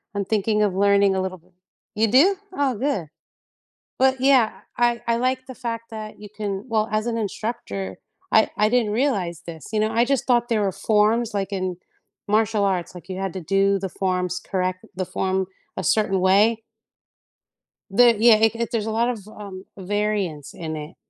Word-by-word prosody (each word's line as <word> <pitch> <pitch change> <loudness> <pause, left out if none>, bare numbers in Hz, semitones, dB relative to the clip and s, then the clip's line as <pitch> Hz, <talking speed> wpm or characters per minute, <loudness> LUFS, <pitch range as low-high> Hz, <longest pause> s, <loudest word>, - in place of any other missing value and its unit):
I'm 200 -1 -1
thinking 210 +1 +1
of 200 - +1
learning 200 0 +4
a 190 - 0
little 185 0 -4
bit. 180 +2 -28 0.4
You 220 +1 +3
do? 310 - +5 0.2
Oh, 280 -6 0
good. 235 - -1 0.9
But, 260 0 +3
yeah, 260 -5 +3
I 240 -1 +2
I 230 - +2
like 255 +1 -1
the 260 - -8
fact 230 -2 -5
that 215 -1 -8
you 210 - -9
can 205 -1 -4
well, 220 -1 +1
as 215 +2 0
an 235 - -1
instructor, 100 - -4 0.3
I - - +5
I 210 +1 +3
didn't 230 -3 +1
realize 200 - 0
this, 160 -4 -9
you 215 - +1
know, 215 +1 +1
I 230 +2 +3
just 270 -1 0
thought 240 -1 +2
there 220 -3 +1
were 195 - 0
forms, 220 +3 +2
like, 195 0 -2
in 185 -2 -2 0.5
martial 215 0 +2
arts, 185 -2 -1
like, 175 0 -11
you 185 0 -5
had 195 -2 -3
to 185 - -4
do 195 +3 +2
the 190 0 -4
forms 180 -1 -1
correct 185 -1 -2
the 185 - -1
form 190 +1 -1 0.3
a 190 - -3
certain 195 0 +2
way. 210 +4 +4 1.3
There 235 +1 +6
yeah, 225 +1 +7
it 225 +1 +3
it 235 0 -2
there's 225 -3 -1
a 220 - -2
lot 235 +2 +1
of, 210 -5 -5
um, 200 -3 -9
variance 195 -6 -2
in 160 -2 -5
it, 150 +2 -8
210 Hz, 190 wpm, -23 LUFS, 190-230 Hz, 1.3 s, yeah